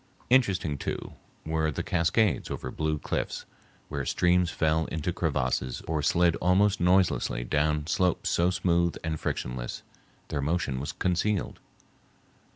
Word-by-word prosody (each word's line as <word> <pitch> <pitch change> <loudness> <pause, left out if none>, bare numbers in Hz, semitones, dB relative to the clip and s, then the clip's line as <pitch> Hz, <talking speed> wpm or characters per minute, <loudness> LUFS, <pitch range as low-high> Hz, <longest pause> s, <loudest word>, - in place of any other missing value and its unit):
Interesting, 95 - +2
too, - - -4 0.3
were 80 0 0
the 75 - -3
cascades 90 +4 +1
over - - -5
blue 80 0 -1
cliffs, - - -3 0.4
where - - -3
streams 90 0 +2
fell 80 -1 +1
into 80 +3 -3
crevasses 65 -6 -1
or 80 -2 0
slid 85 +3 +3
almost 95 +2 +3
noiselessly 90 -9 +2
down 75 +3 0
slopes 90 +2 +1
so 85 +1 +3
smooth 85 -2 +1
and 80 -2 -2
frictionless - - -4 0.5
their 75 - -2
motion 75 -3 -1
was 70 - -3
concealed. 95 +2 -1
85 Hz, 130 wpm, -28 LUFS, 75-90 Hz, 0.5 s, slid